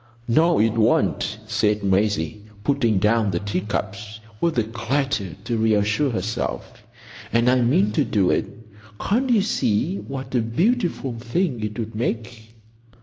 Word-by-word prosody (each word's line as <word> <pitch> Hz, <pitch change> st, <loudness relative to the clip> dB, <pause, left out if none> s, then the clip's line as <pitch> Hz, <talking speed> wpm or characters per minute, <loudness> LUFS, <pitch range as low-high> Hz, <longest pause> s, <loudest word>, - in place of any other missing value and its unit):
"No, 165 Hz, +8 st, +4 dB
it 115 Hz, +1 st, +3 dB
won't," 110 Hz, -2 st, +1 dB
said 105 Hz, -2 st, 0 dB
Maisie, 100 Hz, -1 st, 0 dB, 0.2 s
putting 115 Hz, -4 st, +2 dB
down 105 Hz, +2 st, +2 dB
the 85 Hz, -, -1 dB
teacups 105 Hz, +1 st, -4 dB, 0.2 s
with 170 Hz, -5 st, +1 dB
a 115 Hz, -, +3 dB
clatter 115 Hz, -, -2 dB
to 115 Hz, +1 st, -2 dB
reassure 110 Hz, +5 st, +2 dB
herself. 110 Hz, -1 st, -4 dB, 0.5 s
"And 115 Hz, +1 st, +2 dB
I 125 Hz, 0 st, +4 dB
mean 105 Hz, -4 st, +3 dB
to -, -, +2 dB
do 95 Hz, -4 st, +2 dB
it. -, -, 0 dB, 0.5 s
Can't 250 Hz, +6 st, 0 dB
you 225 Hz, -5 st, +4 dB
see 170 Hz, -, 0 dB
what 135 Hz, -4 st, -7 dB
a 125 Hz, -, +3 dB
beautiful 165 Hz, -, 0 dB
thing 125 Hz, -, -1 dB
it 105 Hz, +1 st, -4 dB
would 115 Hz, -1 st, -4 dB
make?" 115 Hz, 0 st, -4 dB
115 Hz, 145 wpm, -23 LUFS, 105-130 Hz, 0.5 s, No